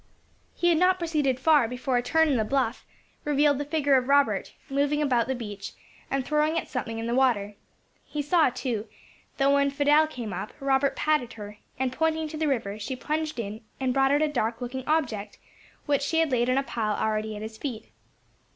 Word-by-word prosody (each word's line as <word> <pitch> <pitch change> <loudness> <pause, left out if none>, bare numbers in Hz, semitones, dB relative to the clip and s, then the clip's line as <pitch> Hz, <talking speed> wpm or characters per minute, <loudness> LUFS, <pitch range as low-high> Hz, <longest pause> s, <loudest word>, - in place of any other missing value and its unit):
He 345 - +2
had 330 -2 +3
not 365 +1 +4
proceeded 300 -7 0
far 295 -3 +4
before 250 +2 -2
a 245 - +3
turn 320 +6 +3
in 280 -4 +2
the 220 - +2
bluff 255 0 -1 0.4
revealed 290 -1 +2
the 290 - -2
figure 285 -2 +2
of 255 -1 -1
Robert, 280 0 +2 0.2
moving 285 +1 +1
about 250 -6 +2
the 265 - -1
beach, 205 -4 -7 0.4
and 270 -2 -1
throwing 305 +2 +1
at - - -2
something 230 -4 -4
in 225 - -4
the 235 - -1
water. 235 -6 +2 0.5
He 295 -1 -4
saw, 320 0 +4
too, 245 -3 -3 0.5
that 275 0 +3
when 280 0 +3
Fidelle 290 +2 +4
came 240 -9 -6
up, 200 - -5
Robert 275 0 +1
patted 300 -6 0
her, 210 -1 -9 0.2
and 260 -1 -1
pointing 320 +1 0
to 310 - -6
the 310 0 0
river, 215 -7 -1
she 230 +5 -4
plunged 310 +3 -3
in 215 0 -5 0.2
and 260 -1 0
brought 270 0 +3
out 290 +2 +3
a - - +3
dark 230 -5 -1
looking 255 +1 -5
object, 240 -10 -1 0.5
which 285 -2 +1
she 325 +3 +2
laid 250 -4 +1
on 255 - +2
a 275 - +2
pile 215 -5 -2
already 215 0 -1
at 210 - -6
his 220 0 -8
feet. 250 -7 -6
270 Hz, 205 wpm, -26 LUFS, 235-295 Hz, 0.5 s, not